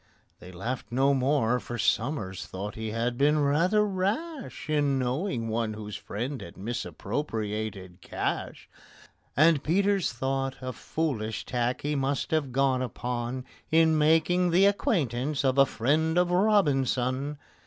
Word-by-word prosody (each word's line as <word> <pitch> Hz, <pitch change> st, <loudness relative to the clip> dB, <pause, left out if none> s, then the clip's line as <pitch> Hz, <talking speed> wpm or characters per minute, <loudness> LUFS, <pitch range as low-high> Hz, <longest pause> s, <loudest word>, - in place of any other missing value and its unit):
They 90 Hz, -, -11 dB
laughed 115 Hz, +8 st, -4 dB
no 135 Hz, +3 st, +3 dB
more, 130 Hz, -3 st, +2 dB
for 120 Hz, +3 st, -6 dB
SOMERS 110 Hz, -, -1 dB
thought 100 Hz, +3 st, -5 dB
he 110 Hz, 0 st, -5 dB
had 120 Hz, +3 st, -2 dB
been 150 Hz, +2 st, +4 dB
rather 165 Hz, +9 st, +3 dB
rash 220 Hz, -, -3 dB
In 145 Hz, -3 st, +2 dB
knowing 125 Hz, -, -1 dB
one 110 Hz, -1 st, -1 dB
whose 105 Hz, -1 st, -7 dB
friend 125 Hz, +6 st, -4 dB
had 85 Hz, -, -10 dB
misappropriated 110 Hz, -, -4 dB
cash; -, -, -4 dB, 0.7 s
And 155 Hz, -1 st, +5 dB
PETER 200 Hz, +5 st, +2 dB
thought 135 Hz, -1 st, -1 dB
a 130 Hz, 0 st, -5 dB
foolish 110 Hz, -3 st, -3 dB
tack 125 Hz, 0 st, -1 dB
he 145 Hz, +1 st, -1 dB
must 140 Hz, -1 st, -1 dB
have 155 Hz, -5 st, 0 dB
gone 130 Hz, 0 st, +2 dB
upon 125 Hz, +1 st, -3 dB, 0.2 s
In 160 Hz, 0 st, +4 dB
making 165 Hz, +4 st, +3 dB
the 180 Hz, +3 st, +5 dB
acquaintance 150 Hz, -, +1 dB
of 130 Hz, +1 st, +2 dB
a 135 Hz, -, +7 dB
friend 155 Hz, +8 st, +1 dB
of 180 Hz, 0 st, +3 dB
ROBINSON. 145 Hz, -, +2 dB
135 Hz, 135 wpm, -28 LUFS, 120-160 Hz, 0.7 s, a